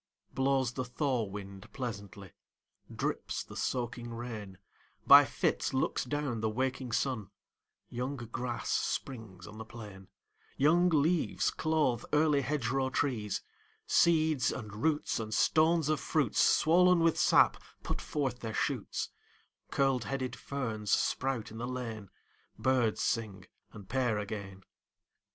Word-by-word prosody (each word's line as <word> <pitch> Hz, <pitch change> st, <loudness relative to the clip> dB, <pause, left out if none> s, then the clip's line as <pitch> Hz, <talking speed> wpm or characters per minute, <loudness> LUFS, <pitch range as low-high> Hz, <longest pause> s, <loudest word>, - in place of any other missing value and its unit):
Blows 135 Hz, -2 st, +1 dB
the 130 Hz, -, -2 dB
thaw 125 Hz, -1 st, -1 dB
wind 100 Hz, -1 st, -9 dB
pleasantly, 100 Hz, -6 st, -6 dB, 0.6 s
Drips -, -, -3 dB
the -, -, -12 dB
soaking 120 Hz, -1 st, -3 dB
rain, 110 Hz, -5 st, -7 dB, 0.5 s
By -, -, +10 dB
fits -, -, -1 dB
looks 130 Hz, -, 0 dB
down 140 Hz, -4 st, -2 dB
the 110 Hz, -, +1 dB
waking 130 Hz, +2 st, -2 dB
sun: 115 Hz, -4 st, -1 dB, 0.6 s
Young 125 Hz, +4 st, -3 dB
grass 120 Hz, 0 st, -4 dB
springs 110 Hz, -9 st, -3 dB
on 105 Hz, +2 st, -11 dB
the -, -, -5 dB
plain; 105 Hz, -4 st, -11 dB, 0.5 s
Young 170 Hz, +6 st, +4 dB
leaves 160 Hz, +1 st, +2 dB
clothe 150 Hz, -7 st, 0 dB
early 150 Hz, -1 st, +4 dB
hedgerow 135 Hz, -1 st, 0 dB
trees; 120 Hz, -7 st, -1 dB, 0.4 s
Seeds, 155 Hz, -6 st, +3 dB
and 110 Hz, -5 st, -6 dB
roots, 150 Hz, +3 st, 0 dB
and 110 Hz, -1 st, -3 dB
stones 155 Hz, +7 st, +3 dB
of 155 Hz, -1 st, +1 dB
fruits, 140 Hz, -8 st, 0 dB
Swollen 180 Hz, +2 st, +5 dB
with 165 Hz, -1 st, +3 dB
sap, -, -, +4 dB, 0.2 s
put -, -, -3 dB
forth 135 Hz, -5 st, -2 dB
their 110 Hz, -1 st, -5 dB
shoots; -, -, -2 dB, 0.6 s
Curled 135 Hz, -3 st, +1 dB
headed 130 Hz, -2 st, -3 dB
ferns 115 Hz, -7 st, -4 dB
sprout 130 Hz, -1 st, 0 dB
in 110 Hz, -, -8 dB
the 120 Hz, -, -3 dB
lane; 115 Hz, -6 st, -5 dB, 0.5 s
Birds 125 Hz, -4 st, +1 dB
sing 100 Hz, -5 st, -2 dB, 0.3 s
and 100 Hz, -3 st, -11 dB
pair 125 Hz, -2 st, 0 dB
again. 100 Hz, -2 st, -6 dB
125 Hz, 130 wpm, -31 LUFS, 110-140 Hz, 0.6 s, By